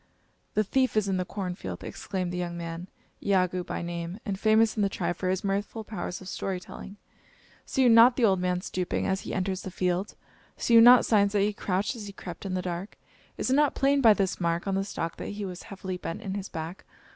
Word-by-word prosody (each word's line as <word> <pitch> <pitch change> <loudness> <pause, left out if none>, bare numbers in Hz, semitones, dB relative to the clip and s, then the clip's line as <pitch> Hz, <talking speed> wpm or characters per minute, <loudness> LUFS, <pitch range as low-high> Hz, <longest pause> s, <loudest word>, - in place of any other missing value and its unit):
"The 215 - +3
thief 255 +2 +1
is 210 -2 +2
in 190 -1 0
the 185 - -1
corn 185 -1 -4
field!" 180 - -7
exclaimed 185 -3 -4
the - - -3
young 175 -1 -3
man, 170 +1 -6 0.4
Iagoo 185 -2 +1
by - - -4
name, 170 +3 -5
and 195 -2 -3
famous 220 +1 +4
in 215 - 0
the 200 - +2
tribe 175 -2 -2
for 185 +2 -2
his 185 0 -1
mirthful 200 +3 -2
powers 195 -4 -5
of 190 - -10
story 190 0 -3
telling; 195 +2 -10 0.7
"see 265 - +1
you 250 - +6
not 230 +2 +8
the 245 - +3
old 190 -3 +3
man 180 0 0
stooping 180 -1 -2
as 190 0 0
he - - -6
enters 190 0 -1
the - - -6
field? 180 +2 -1 0.4
See 235 - 0
you 230 - +10
not 245 +1 +8
signs 200 -2 +3
that 205 - +3
he 210 +1 +1
crouched 200 +4 -1
as 215 -3 -7
he 200 - -8
crept 180 0 -8
in 185 - -2
the 185 - -2
dark? 180 +3 -5 0.4
Is - - -1
it - - +4
not 295 0 +3
plain 275 0 +3
by 225 -4 +7
this 195 -2 -1
mark 170 0 0
on 195 - 0
the 195 0 +1
stalk 165 -4 -4
that - - -6
he 205 - -3
was 180 -2 -6
heavily 190 -2 -5
bent 165 - -6
in 190 - -3
his 200 -1 -5
hack? 165 +3 -6
190 Hz, 240 wpm, -28 LUFS, 180-210 Hz, 0.7 s, you